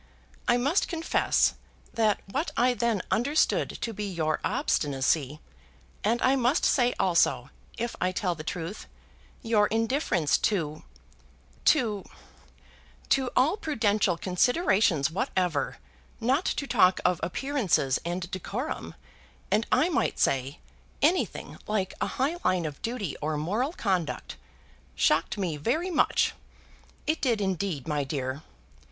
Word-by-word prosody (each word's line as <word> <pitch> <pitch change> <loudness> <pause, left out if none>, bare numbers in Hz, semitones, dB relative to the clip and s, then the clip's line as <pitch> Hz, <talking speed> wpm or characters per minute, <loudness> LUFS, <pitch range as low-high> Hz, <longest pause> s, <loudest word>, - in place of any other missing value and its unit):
"I 240 - +4
must 280 +10 +1
confess 330 -2 +2 0.4
that 220 -2 +2
what 300 - -1
I 250 +1 +4
then 235 -5 0
understood 280 +7 +2
to 230 - -2
be 210 0 -4
your 155 -3 -1
obstinacy, 145 +1 0 0.6
and 230 +3 +2
I 260 +1 +4
must 260 +5 +2
say 245 -3 +3
also, 170 -8 +2 0.3
if 235 +1 -3
I 185 - +2
tell 185 -2 -1
the 155 -2 -8
truth, 170 +4 -5 0.6
your 215 -2 +3
indifference 225 - +1
to 160 -7 -1 0.8
to 225 -9 +3 1.1
to 265 -3 +2
all 300 +10 +3
prudential 215 - +1
considerations 190 - +2
whatever, 180 - -1 0.4
not 265 +9 +1
to 280 - -1
talk 190 -8 +4
of 180 -2 +3
appearances 185 - 0
and 175 +1 -4
decorum, 215 - -4 0.6
and 215 +2 +2
I 325 - +4
might 345 - 0
say, 135 +1 +1 0.5
anything 340 +5 0
like 205 -3 -1
a - - +1
high 285 +6 +1
line 180 -2 +1
of 150 -2 -6
duty 225 - -3
or 155 0 -1
moral 210 - -1
conduct, 185 - -2 0.6
shocked 160 +6 +2
me 175 -6 -2
very 315 - -1
much. 320 - +2 0.7
It 310 +1 0
did, 235 -5 +2
indeed, 190 -7 -2
my 150 -2 0
dear. 135 0 -3
205 Hz, 125 wpm, -27 LUFS, 165-250 Hz, 1.1 s, I